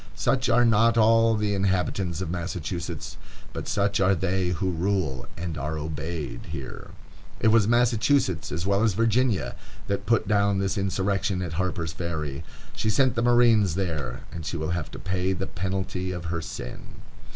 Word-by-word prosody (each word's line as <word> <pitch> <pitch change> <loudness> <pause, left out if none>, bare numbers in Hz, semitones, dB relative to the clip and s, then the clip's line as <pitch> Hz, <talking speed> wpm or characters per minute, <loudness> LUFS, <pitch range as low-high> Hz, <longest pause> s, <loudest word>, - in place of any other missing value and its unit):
Such - - +1
are 120 +1 +5
not 115 +1 +4
all 115 0 +5
the 105 -1 0
inhabitants 95 -2 0
of 85 -3 -3
Massachusetts, 85 -1 -4 0.4
but - - -5
such 100 +1 +1
are 95 0 +4
they 95 +1 0
who 90 +1 -1
rule 85 -6 -1
and 85 -2 -4
are 75 +2 -3
obeyed 75 -4 -5
here. 65 - -7 0.5
It 110 - +4
was 110 -2 +4
Massachusetts, 120 - +2
as 85 +1 -3
well 100 +1 +2
as 110 -4 +2
Virginia, 115 0 +1 0.3
that 100 0 -3
put 115 -4 +2
down 100 -1 +2
this 95 -1 0
insurrection 95 -1 0
at 85 -3 -4
Harper's 85 -2 -2
Ferry. 80 -3 -4 0.3
She 110 - 0
sent 130 +4 +3
the 115 - 0
marines 120 -7 +4
there, 85 -7 -3
and 85 - -6
she 85 - -3
will 80 +1 -2
have 85 -3 -2
to - - -9
pay 95 0 -1
the 95 +1 -3
penalty 95 0 -3
of 90 -1 -5
her 85 - -2
sin. 60 -6 -8
95 Hz, 170 wpm, -26 LUFS, 85-105 Hz, 0.5 s, are